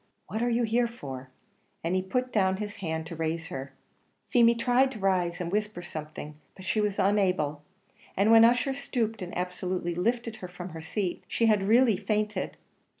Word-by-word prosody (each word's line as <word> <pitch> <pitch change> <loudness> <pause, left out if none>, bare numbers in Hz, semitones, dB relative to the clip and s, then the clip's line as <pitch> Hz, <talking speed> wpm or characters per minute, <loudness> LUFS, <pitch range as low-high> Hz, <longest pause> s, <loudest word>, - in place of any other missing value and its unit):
what 220 - -4
are 240 - +2
you 240 0 +2
here 235 +2 +2
for?" 135 - -8 0.5
and 170 +3 0
he 185 - +2
put 250 +7 -2
down 190 -3 +3
his 205 0 -5
hand 160 -4 -3
to 165 - -7
raise 165 0 -2
her. 135 +1 -6 0.6
Feemy 235 -1 +6
tried 250 +3 +3
to - - -7
rise 180 -2 +1
and 175 -1 -3
whisper 210 -3 -2
something, 155 -2 -7 0.2
but 190 - -11
she 215 +3 +1
was 205 -1 0
unable, 185 -7 +2 0.6
and 200 +3 +4
when 225 0 +9
Ussher 245 +3 +4
stooped 230 -5 -2
and 180 -1 -5
absolutely 180 -1 -2
lifted 230 +5 -1
her 180 - -7
from 180 +1 -8
her 160 -1 -8
seat, 185 +2 -3
she 230 - +1
had 210 -3 +3
really 230 -2 +5
fainted. 210 -2 -1
195 Hz, 185 wpm, -28 LUFS, 175-230 Hz, 0.6 s, when